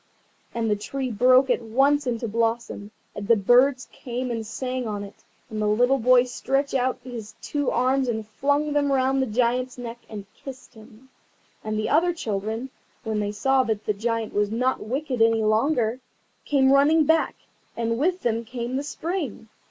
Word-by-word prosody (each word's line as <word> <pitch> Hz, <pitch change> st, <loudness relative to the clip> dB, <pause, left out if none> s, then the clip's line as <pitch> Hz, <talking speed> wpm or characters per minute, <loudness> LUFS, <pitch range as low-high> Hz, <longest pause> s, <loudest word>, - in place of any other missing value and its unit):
And 230 Hz, -1 st, -2 dB
the 210 Hz, -, +2 dB
tree 255 Hz, +5 st, -4 dB
broke 255 Hz, +4 st, +5 dB
at -, -, +1 dB
once 270 Hz, +5 st, +2 dB
into 235 Hz, -1 st, -2 dB
blossom, 225 Hz, -2 st, -2 dB, 0.3 s
and 200 Hz, -, -6 dB
the 230 Hz, -, +6 dB
birds 250 Hz, +5 st, +3 dB
came 250 Hz, 0 st, -5 dB
and 230 Hz, -1 st, -3 dB
sang 250 Hz, +3 st, -4 dB
on 205 Hz, -1 st, -4 dB
it, 200 Hz, -, -13 dB, 0.2 s
and 215 Hz, -2 st, -5 dB
the 210 Hz, -, +1 dB
little 245 Hz, +6 st, +3 dB
boy 250 Hz, +1 st, +5 dB
stretched 270 Hz, +3 st, -2 dB
out 260 Hz, -1 st, +1 dB
his 225 Hz, -4 st, -8 dB
two 290 Hz, -2 st, -2 dB
arms 260 Hz, +1 st, +1 dB
and 220 Hz, -3 st, -3 dB
flung 285 Hz, +6 st, 0 dB
them 285 Hz, -1 st, +1 dB
round 265 Hz, 0 st, +2 dB
the 265 Hz, -, 0 dB
Giant's 250 Hz, +3 st, 0 dB
neck, 240 Hz, -1 st, -7 dB
and 205 Hz, -2 st, -7 dB
kissed 260 Hz, -2 st, -11 dB
him. 225 Hz, +3 st, -17 dB, 0.5 s
And 215 Hz, 0 st, -3 dB
the 215 Hz, -, -1 dB
other 345 Hz, +4 st, +3 dB
children, 220 Hz, 0 st, -3 dB, 0.3 s
when 220 Hz, -2 st, -2 dB
they 205 Hz, 0 st, -1 dB
saw 265 Hz, +6 st, +2 dB
that 220 Hz, -4 st, -2 dB
the 210 Hz, -, +1 dB
Giant 225 Hz, +1 st, -2 dB
was 205 Hz, 0 st, +1 dB
not 250 Hz, +4 st, 0 dB
wicked 255 Hz, +1 st, -3 dB
any 225 Hz, -1 st, +4 dB
longer, 225 Hz, +2 st, +1 dB, 0.5 s
came 270 Hz, -2 st, +3 dB
running 300 Hz, +3 st, +5 dB
back, 320 Hz, +2 st, +2 dB, 0.4 s
and 230 Hz, 0 st, -1 dB
with 360 Hz, +5 st, +1 dB
them 230 Hz, -1 st, 0 dB
came 245 Hz, +1 st, -4 dB
the 280 Hz, -, -2 dB
Spring. 300 Hz, -, -4 dB
245 Hz, 180 wpm, -24 LUFS, 220-270 Hz, 0.5 s, the